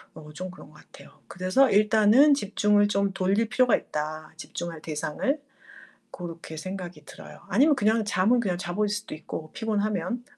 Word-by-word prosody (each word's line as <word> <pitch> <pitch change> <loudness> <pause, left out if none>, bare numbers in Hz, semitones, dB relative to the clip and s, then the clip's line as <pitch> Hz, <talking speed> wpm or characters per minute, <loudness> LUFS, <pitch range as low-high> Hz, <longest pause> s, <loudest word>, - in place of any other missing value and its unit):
어 150 -1 -11
좀 185 +4 -6
그런 180 - -14
것 - - -21
같아요. - - -16 0.2
그래서 185 +10 +2
일단은 215 +7 +5
집중을 205 -4 +2
좀 200 -1 0
돌릴 195 +4 +1
필요가 250 -1 +4
있다 155 +1 -5
집중할 165 -1 -6
대상을. 160 - -2 0.8
고렇게 165 -2 -8
생각이 185 +1 -7
들어요. - - -12
아니면 295 +2 +4
그냥 220 -2 +2
잠은 210 +4 +2
그냥 185 -6 -1
자버릴 185 +4 -1
수도 210 +1 -4
있고 155 0 -7
피곤하면. 215 0 -2
200 Hz, 345 characters per minute, -26 LUFS, 175-220 Hz, 0.8 s, 일단은